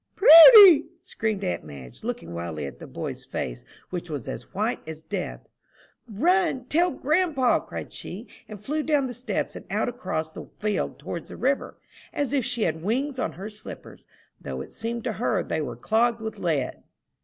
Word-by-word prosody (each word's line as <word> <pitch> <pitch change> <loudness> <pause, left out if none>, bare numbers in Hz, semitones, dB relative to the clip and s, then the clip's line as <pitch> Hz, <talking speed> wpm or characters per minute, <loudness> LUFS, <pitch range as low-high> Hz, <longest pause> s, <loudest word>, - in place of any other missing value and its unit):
"Prudy!" 360 -2 +10 0.2
screamed 215 -3 -3
aunt 180 - -2
Madge, 65 -5 -12
looking 85 +1 -5
wildly 85 -3 -5
at 70 - -9
the - - -10
boy's - - -6
face, - - -5 0.3
which 175 -1 -5
was 145 -6 -5
as - - -7
white 215 +5 -1
as 160 0 -8
death. - - -5 0.6
"Run, 325 - +1
tell 340 +7 +2
grandpa!" 300 -3 +1
cried - - -8
she, - - -7 0.2
and 210 -2 -8
flew 295 +9 -2
down 295 -3 +1
the 250 - -5
steps, 245 -3 -3
and - - -8
out 210 +5 0
across 160 -10 -4
the - - -9
field 210 -1 -2
towards 170 - -7
the - - -9
river, 275 +4 -1 0.4
as 285 -1 -2
if 275 -3 +1
she 225 0 -1
had 160 -3 -1
wings 260 - -1
on - - -2
her 190 +5 -7
slippers, 215 0 -11 0.3
though - - -5
it - - -10
seemed 230 +1 -4
to 235 - -2
her 215 -5 0
they 160 - -2
were 150 - -5
clogged 230 +1 +1
with 220 -1 -6
lead. 155 -7 -1
220 Hz, 180 wpm, -25 LUFS, 160-270 Hz, 0.6 s, Prudy